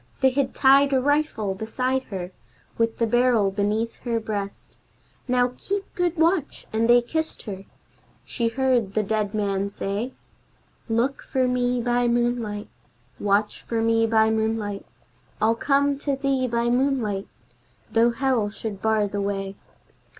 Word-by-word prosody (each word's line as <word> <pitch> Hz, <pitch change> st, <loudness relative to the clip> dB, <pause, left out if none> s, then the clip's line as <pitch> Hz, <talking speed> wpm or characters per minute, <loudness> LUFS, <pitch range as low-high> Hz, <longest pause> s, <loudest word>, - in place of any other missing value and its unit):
They 265 Hz, 0 st, +5 dB
had 265 Hz, 0 st, -1 dB
tied 275 Hz, +1 st, +5 dB
a 265 Hz, -, +4 dB
rifle 285 Hz, -7 st, 0 dB
beside 255 Hz, +6 st, -2 dB
her, 185 Hz, -3 st, -6 dB, 0.4 s
with 230 Hz, 0 st, 0 dB
the 230 Hz, -, +2 dB
barrel 235 Hz, -3 st, +3 dB
beneath 210 Hz, +3 st, -1 dB
her 235 Hz, -2 st, -2 dB
breast! 205 Hz, -2 st, -6 dB, 0.5 s
"Now 250 Hz, 0 st, +2 dB
keep 395 Hz, 0 st, -2 dB
good 355 Hz, -1 st, 0 dB
watch!" 325 Hz, -1 st, +1 dB
and 225 Hz, +1 st, +1 dB
they 240 Hz, 0 st, +6 dB
kissed 320 Hz, +6 st, -3 dB
her. 195 Hz, -3 st, -7 dB, 0.6 s
She 235 Hz, -3 st, -1 dB
heard 240 Hz, -4 st, +1 dB
the 215 Hz, -, +2 dB
dead 210 Hz, 0 st, -1 dB
man 200 Hz, -1 st, 0 dB
say, 200 Hz, +5 st, -3 dB, 0.8 s
"Look 235 Hz, +5 st, 0 dB
for 260 Hz, -1 st, 0 dB
me 250 Hz, -1 st, 0 dB
by 245 Hz, 0 st, +2 dB
moonlight, 235 Hz, -3 st, -1 dB, 0.5 s
Watch 205 Hz, +1 st, +1 dB
for 230 Hz, -, -2 dB
me 225 Hz, 0 st, +3 dB
by 220 Hz, 0 st, +3 dB
moonlight, 220 Hz, -2 st, -2 dB, 0.5 s
I'll 220 Hz, +2 st, +3 dB
come 280 Hz, +3 st, +1 dB
to 285 Hz, -1 st, -1 dB
thee 270 Hz, -1 st, 0 dB
by 235 Hz, 0 st, 0 dB
moonlight, 245 Hz, -6 st, 0 dB, 0.6 s
though 230 Hz, +1 st, +4 dB
Hell 240 Hz, -3 st, 0 dB
should 205 Hz, -1 st, -6 dB
bar 220 Hz, -2 st, +2 dB
the 200 Hz, 0 st, -3 dB
way." 195 Hz, -1 st, -3 dB
230 Hz, 145 wpm, -24 LUFS, 210-260 Hz, 0.8 s, they